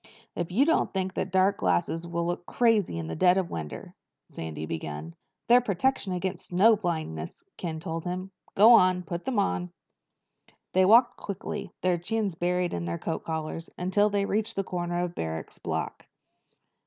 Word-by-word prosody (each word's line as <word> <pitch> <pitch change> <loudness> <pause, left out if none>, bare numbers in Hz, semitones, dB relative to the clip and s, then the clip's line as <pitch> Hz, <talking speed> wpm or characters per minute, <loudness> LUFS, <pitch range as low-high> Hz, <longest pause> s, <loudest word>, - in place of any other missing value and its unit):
"If 175 0 -3
you 245 +10 +4
don't 325 - +2
think 190 -1 -2 0.2
dark 190 +2 +3
glasses 90 - 0
will 170 0 -2
look 175 0 -3
crazy, 220 - +2
in 85 - -3
the 80 0 -5
dead 180 0 +4
of 185 -3 -1
winter—" 80 -2 -6 0.4
Sandy 80 -1 -6
began. 80 0 -5 0.3
"They're 245 +1 +7
a - - -4
protection 215 -1 0
against 180 0 -3
snow 205 +6 +5
blindness," 160 - -4
Ken 160 -3 -4
told 165 -1 -4
him. 185 +2 -4 0.2
"Go 220 +4 +8
on. 185 -4 +5
Put 170 +1 -5
them 260 -4 -1
on." 90 - 0 1.0
They 185 0 +5
walked 235 +5 +6
quickly, 195 -1 -5
their 180 -1 +2
chins 210 +2 -1
buried 175 +1 0
in 85 0 -3
their 85 0 -2
coat 160 - -4
collars, 160 +1 -4
until 195 +4 +2
they 200 -1 0
reached 220 +2 -1
the 195 - 0
corner 175 -1 -2
of 175 -1 -3
Barrack's 80 - -5
block. - - -4
180 Hz, 170 wpm, -27 LUFS, 160-200 Hz, 1.0 s, Go